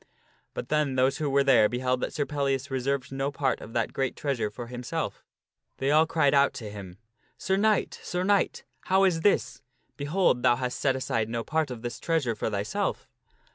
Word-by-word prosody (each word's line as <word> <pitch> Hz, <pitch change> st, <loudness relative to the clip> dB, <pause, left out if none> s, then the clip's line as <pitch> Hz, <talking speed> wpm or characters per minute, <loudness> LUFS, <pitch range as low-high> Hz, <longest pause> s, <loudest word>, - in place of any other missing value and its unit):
But -, -, -5 dB
then 150 Hz, -3 st, +1 dB
those 130 Hz, +3 st, +2 dB
who 150 Hz, -2 st, 0 dB
were 140 Hz, 0 st, +3 dB
there 120 Hz, -6 st, +5 dB
beheld 125 Hz, +1 st, -1 dB
that -, -, -2 dB
Sir 145 Hz, -, -1 dB
Pellias 140 Hz, -2 st, -1 dB
reserved 135 Hz, 0 st, -1 dB
no 135 Hz, +1 st, -2 dB
part 140 Hz, -2 st, -1 dB
of 115 Hz, -, -10 dB
that 115 Hz, -2 st, -1 dB
great 135 Hz, -2 st, -1 dB
treasure 135 Hz, -7 st, -1 dB
for 120 Hz, +3 st, -8 dB
himself, 125 Hz, +1 st, -4 dB, 0.5 s
they 135 Hz, +1 st, 0 dB
all 155 Hz, +2 st, +5 dB
cried 150 Hz, -4 st, +2 dB
out 140 Hz, 0 st, +3 dB
upon 110 Hz, -3 st, -7 dB
him: 95 Hz, -3 st, -9 dB, 0.2 s
" -, -, -40 dB
Sir 190 Hz, -, +3 dB
Knight! 210 Hz, +1 st, +1 dB
Sir 180 Hz, 0 st, -2 dB
Knight! 200 Hz, +1 st, +1 dB, 0.2 s
How 190 Hz, +1 st, +3 dB
is 175 Hz, -4 st, +2 dB
this? 135 Hz, -, +1 dB, 0.4 s
Behold, 145 Hz, -3 st, +1 dB
thou 120 Hz, -1 st, +4 dB
hast 125 Hz, 0 st, -3 dB
set 135 Hz, -2 st, +2 dB
aside 115 Hz, -4 st, -1 dB
no 115 Hz, 0 st, -2 dB
part 155 Hz, +1 st, 0 dB
of 120 Hz, -2 st, -7 dB
this 120 Hz, 0 st, -5 dB
treasure 160 Hz, -8 st, 0 dB
for 110 Hz, -, -2 dB
thyself." 105 Hz, 0 st, -2 dB
135 Hz, 200 wpm, -27 LUFS, 120-150 Hz, 0.5 s, there